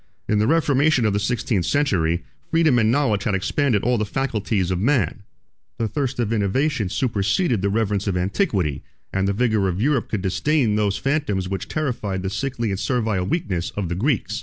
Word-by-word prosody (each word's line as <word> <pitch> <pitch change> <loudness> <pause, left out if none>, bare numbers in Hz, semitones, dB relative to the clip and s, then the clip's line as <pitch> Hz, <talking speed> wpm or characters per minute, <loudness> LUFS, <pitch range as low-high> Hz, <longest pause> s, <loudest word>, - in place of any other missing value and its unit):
In 105 - +2
the 105 - +2
reformation 150 -4 +3
of 105 - +2
the 100 - +1
sixteenth 110 -4 -1
century, 90 - +1 0.3
freedom 160 -6 +3
and 110 0 +3
knowledge 115 -7 +1
had 105 -4 +1
expanded 115 +3 +1
all 120 -1 +2
the - - +1
faculties 105 -5 -1
of 90 - 0
man: 105 - +1 0.6
the 115 - 0
thirst 135 +4 -2
of 115 -2 0
innovation 110 +2 0
superseded 110 - 0
the 100 - +1
reverence 105 -1 0
of 95 -2 0
antiquity; 90 - 0 0.3
and 95 0 +1
the - - +2
vigor 110 -3 +1
of 90 0 -2
Europe 135 +1 +1
could 105 -3 -2
disdain 125 - +1
those 105 -2 +1
phantoms 135 -6 -1
which 95 0 -4
terrified 110 -11 -2
the 95 - -2
sickly 115 0 -2
and 95 - -2
servile 110 -7 0
weakness 95 - -1
of 95 -5 -2
the 85 - -2
Greeks. 125 -6 0
110 Hz, 185 wpm, -22 LUFS, 95-135 Hz, 0.6 s, reformation